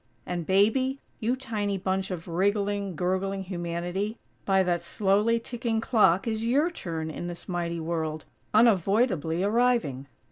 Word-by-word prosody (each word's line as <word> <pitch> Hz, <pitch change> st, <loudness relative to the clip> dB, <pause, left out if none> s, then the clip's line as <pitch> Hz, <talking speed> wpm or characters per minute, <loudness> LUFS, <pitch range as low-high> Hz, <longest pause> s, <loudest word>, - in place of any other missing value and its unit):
And 175 Hz, -2 st, -4 dB
Baby, 225 Hz, +8 st, +3 dB, 0.2 s
you 235 Hz, +2 st, +1 dB
tiny 215 Hz, -6 st, -2 dB
bunch 190 Hz, 0 st, -1 dB
of 180 Hz, -2 st, -5 dB
wriggling, 200 Hz, +2 st, 0 dB
gurgling 190 Hz, +3 st, -1 dB
humanity, 175 Hz, +4 st, -3 dB, 0.3 s
by 190 Hz, -1 st, +4 dB
that 175 Hz, -1 st, 0 dB
slowly 210 Hz, +3 st, +2 dB
ticking 230 Hz, -1 st, -2 dB
clock 215 Hz, -5 st, +3 dB
is 220 Hz, -1 st, -1 dB
your 285 Hz, +9 st, +2 dB
turn 160 Hz, -, -4 dB
in 175 Hz, -, -5 dB
this 175 Hz, -1 st, -8 dB
mighty 170 Hz, -2 st, -2 dB
World, 160 Hz, -1 st, -3 dB, 0.3 s
unavoidably 195 Hz, -, +3 dB
arriving. 215 Hz, -, +1 dB
195 Hz, 135 wpm, -27 LUFS, 175-225 Hz, 0.3 s, by